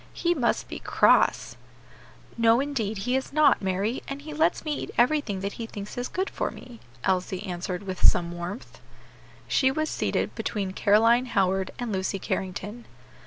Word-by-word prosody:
"He 345 0 +1
must 255 -8 0
be - - -6
cross." - - +3 0.8
"No, 230 0 +4
indeed, 245 -7 -2
he 250 +1 +1
is 265 - -2
not, 295 -4 +4
Mary, 195 +5 -1
and 275 +1 -6
he 305 0 -7
lets 320 +2 +1
me 305 - 0
eat - - -5
everything 240 -6 +2
that 200 +1 -3
he 225 - -4
thinks 205 -2 -8
is 245 0 -3
good 375 +2 -2
for - - -2
me," 240 -3 -12 0.2
Elsie 185 0 0
answered 180 0 -4
with 185 -2 -6
some 170 -1 +4
warmth. 175 +6 -7 0.7
She 265 - +3
was 310 +3 -1
seated - - -1
between 200 -5 -3
Caroline 230 +6 +4
Howard 190 -3 +1
and 245 -2 -3
Lucy 190 0 -1
Carrington. 195 +5 -4
225 Hz, 165 wpm, -26 LUFS, 190-265 Hz, 0.8 s, No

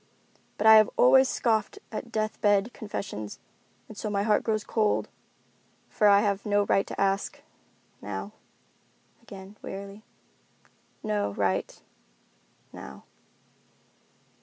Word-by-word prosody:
But 210 - -2
I 220 0 +10
have 215 - +5
always 265 +1 +6
scoffed 220 -3 0
at 230 +1 -6
death 215 -1 -2
bed 205 +2 +2
confessions, 185 - -6 0.5
and 220 - -11
so 215 - -4
my 200 -1 0
heart 210 -1 +2
grows 215 -2 -1
cold, 215 -2 0 0.8
for 210 - +2
I 200 0 +6
have 200 -2 -1
no 205 -1 +2
right 195 - +1
to - - -7
ask—now." 105 - -5 0.9
Again, 195 +1 -12
wearily, 200 +1 -8 1.0
"No 210 - -1
right—now." 65 - -7
205 Hz, 110 wpm, -27 LUFS, 195-215 Hz, 1.0 s, I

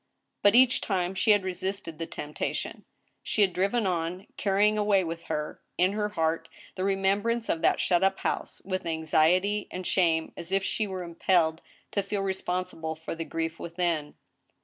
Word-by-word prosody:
But 205 +2 +5
each 255 0 +6
time 185 -2 0
she 190 +3 0
had 205 -2 +6
resisted 185 -2 -3
the 165 - -3
temptation. 150 +1 -4 0.4
She 215 - +2
had 190 -3 +2
driven 200 +5 +1
on 180 +1 -1
— - - -45
carrying 205 +1 +3
away 205 -2 +3
with 165 0 -5
her, 150 0 -3 0.2
in 180 +2 +4
her 210 0 -1
heart, 165 -4 -1 0.2
the 185 - -3
remembrance 200 +4 +1
of 165 - 0
that - - +3
shut 175 0 +2
up 195 0 +3
house, - - -3
with 185 -2 -3
anxiety 165 +6 +2
and 185 0 -6
shame, 165 -4 +2
as 170 +1 -7
if 195 0 +2
she 215 +2 -1
were 190 -2 -4
impelled 170 -1 +1 0.3
to 200 - +1
feel 200 +1 -2
responsible 185 -4 -2
for 160 +1 -6
the 165 0 -5
grief 165 0 -3
within. 170 -3 -2
185 Hz, 175 wpm, -28 LUFS, 165-200 Hz, 0.4 s, each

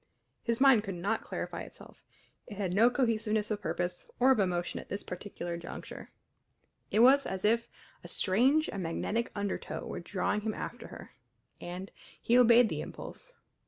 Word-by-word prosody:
His 230 -1 -1
mind 265 -6 +6
could 195 -3 -5
not 200 +6 -1
clarify - - -5
itself; - - -13 0.5
it 205 - -9
had 190 -4 -1
no 225 +5 +6
cohesiveness 225 -4 0
of 210 -1 -2
purpose 175 -2 -3
or 260 +2 +6
of 260 - +3
emotion 180 -3 0
at - - -11
this 200 - -4
particular 175 -2 -6
juncture. 170 - -8 0.8
It 215 - +3
was 270 +3 +6
as 190 +1 -3
if 230 +2 +2 0.3
a - - -8
strange 260 +11 +3
and 200 - -4
magnetic 205 +7 -2
undertow 205 -1 -3
were - - -5
drawing 195 +3 -1
him 215 0 -2
after - - -6
her. - - -11 0.5
And 180 +2 -7 0.3
he 235 - +2
obeyed 240 -1 +7
the - - -3
impulse. - - -9
210 Hz, 165 wpm, -31 LUFS, 185-235 Hz, 0.8 s, obeyed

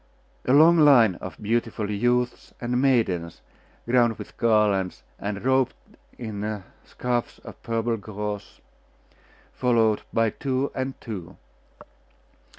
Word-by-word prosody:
A - - +1
long 165 +4 +7
line 130 -9 +6
of - - -7
beautiful 110 -1 -1
youths 120 +4 0
and 125 +1 -1
maidens, 95 -11 +1 0.5
crowned 120 -2 +3
with - - -10
garlands, 105 -5 +1 0.2
and 100 +2 -4
robed 130 -1 +2 0.4
in 105 -3 -4 0.2
scarfs 120 -1 -3
of - - -11
purple 115 0 -1
gauze, 105 0 -6 0.9
followed 115 -4 +2
by 115 -1 +2
two 135 +3 -2
and 130 0 -4
two. 95 -7 -8
115 Hz, 110 wpm, -25 LUFS, 105-125 Hz, 0.9 s, long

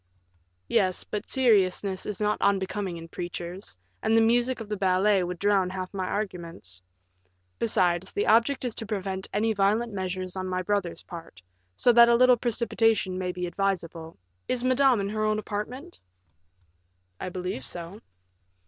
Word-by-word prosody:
"Yes; 190 -5 +1
but 210 +1 -5
seriousness 200 -6 +2
is 205 -3 -3
not 210 0 0
unbecoming 195 -2 0
in 165 0 -9
preachers, 175 - -6 0.2
and 225 - +3
the - - +7
music 240 +3 +2
of 225 - -7
the 210 - -2
ballet 190 +1 +3
would 180 0 -4
drown 200 -1 +2
half 185 0 -5
my 190 -2 -2
arguments. 170 - -4 0.8
Besides, 180 -4 +1
the 205 - -1
object 235 +5 +3
is 240 - -1
to 225 - -5
prevent 195 -2 -3
any 220 +2 +1
violent 215 +3 +1
measures 185 -1 -4
on 185 0 -3
my 185 0 -2
brother's 200 -3 -2
part, 165 - -11 0.3
so 245 - +4
that 235 0 +8
a 235 - +6
little 250 +1 +6
precipitation 225 -4 +1
may 180 -1 -1
be 180 0 -4
advisable. 175 -3 -3 0.3
Is 250 -1 0
Madame 255 -3 +4
in 200 - -2
her 215 +1 -2
own 215 0 +1
apartment?" 225 - -5 1.2
"I - - -4
believe 180 -6 -4
so." 175 - -5
195 Hz, 155 wpm, -27 LUFS, 185-225 Hz, 1.2 s, that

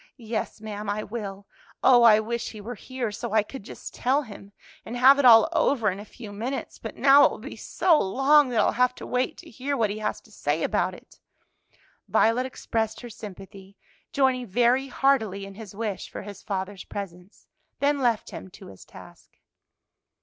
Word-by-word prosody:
"Yes, 225 -3 -4
ma'am, 210 -1 -6
I 210 +1 -2
will. 200 -3 -6 0.4
Oh, 245 -2 +7
I 220 -2 +7
wish 235 +2 -3
he 215 - -10
were 225 +4 -6
here! 245 0 -5
so 205 - -6
I 215 -1 +4
could 265 +5 -9
just 200 - -10
tell 270 +4 +1
him, 205 -4 -12 0.3
and 240 - -6
have 270 +3 +7
it 280 - +3
all 225 -2 +8
over 230 -8 +2
in 190 - -7
a 205 - -9
few 220 -1 -11
minutes. 235 +7 -5
But - - -7
now 280 +1 +7
it - - +5
will - - -7
be - - -9
so 335 -5 +2
long 270 +7 +4
that 235 -3 0
I'll - - +2
have 250 0 +1
to - - -9
wait 250 +1 -1
to - - -13
hear 275 +4 -3
what 220 -4 +1
he 210 - -5
has 215 - -2
to - - -22
say - - -2
about - - 0
it." - - -18 0.9
Violet 240 +3 +2
expressed 225 -3 -3
her 240 -1 -9
sympathy, 195 -1 -11 0.3
joining 260 -3 +1
very 245 +6 +2
heartily 220 -8 +1
in 195 - -10
his 205 -1 -11
wish 215 -2 -4
for - - -8
his 205 0 -10
father's 195 -1 -5
presence, 190 -2 -9 0.3
then 285 0 +1
left 240 -4 0
him - - -8
to - - -13
his 95 - -13
task. - - -16
225 Hz, 195 wpm, -25 LUFS, 205-255 Hz, 0.9 s, all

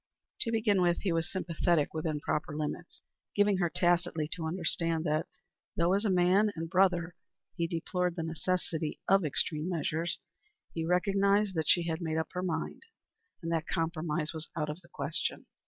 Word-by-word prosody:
To 230 - 0
begin 215 -4 +3
with, 175 -1 +2
he 195 - 0
was 165 0 0
sympathetic 170 -4 +1
within 155 -1 -1
proper 150 0 -2
limits, 155 +3 -5 0.3
giving 205 -1 +4
her 175 -2 +2
tacitly 175 -1 +1
to 165 -2 -3
understand 165 -1 0
that, 155 -1 0 0.5
though 170 +2 +3
as 200 +3 +1
a - - +3
man 185 +3 +4
and 165 0 -3
brother, 180 -2 +3 0.4
he 170 -1 0
deplored 175 +1 -1
the 165 - -2
necessity 165 -1 -2
of 195 -1 +5
extreme 150 +3 0
measures, 165 0 -1 0.6
he 165 -1 -2
recognized 200 +2 +3
that 160 -3 -1
she 175 - +5
had 165 0 -2
made 160 -1 -1
up 160 - -1
her 180 - -3
mind, 165 -3 -2 0.6
and 165 - -2
that 165 -1 0
compromise 160 -1 -1
was 160 -1 -6
out 150 -2 -1
of 155 +5 -9
the 170 - -20
question. - - -2
170 Hz, 170 wpm, -31 LUFS, 160-185 Hz, 0.6 s, of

